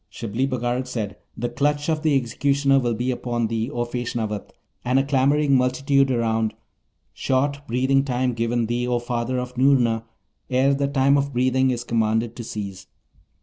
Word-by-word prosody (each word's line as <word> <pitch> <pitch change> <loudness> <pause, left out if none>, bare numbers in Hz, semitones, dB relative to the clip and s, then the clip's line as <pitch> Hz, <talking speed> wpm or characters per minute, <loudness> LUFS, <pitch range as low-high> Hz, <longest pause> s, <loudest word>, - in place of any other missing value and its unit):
Shibli 115 +4 -2
Bagarag 125 0 -1
said, 110 -5 -4 0.2
'The 120 +2 -2
clutch 145 +4 0
of 160 -2 0
the 155 -3 +3
executioner 135 +3 +2
will 120 -3 0
be 125 +3 -1
upon 120 -1 -2
thee, 115 +1 -2
O 120 -4 -2
Feshnavat, 120 -4 -3 0.3
and 125 +2 +1
a 135 - +4
clamouring 140 +1 +2
multitude 135 +2 +2
around; 115 -3 0 0.6
short 140 +2 0
breathing 130 +3 +2
time 125 -2 0
given 115 0 0
thee, 120 +2 -1
O 125 -1 +1
father 120 +1 -2
of 125 0 -4
Noorna, 125 -4 +3 0.5
ere 130 +2 +3
the 140 0 0
time 140 0 +3
of 140 0 -2
breathing 130 +1 +2
is 120 -1 -2
commanded 115 0 0
to 120 - -6
cease. 100 -4 -6
125 Hz, 165 wpm, -23 LUFS, 120-135 Hz, 0.6 s, a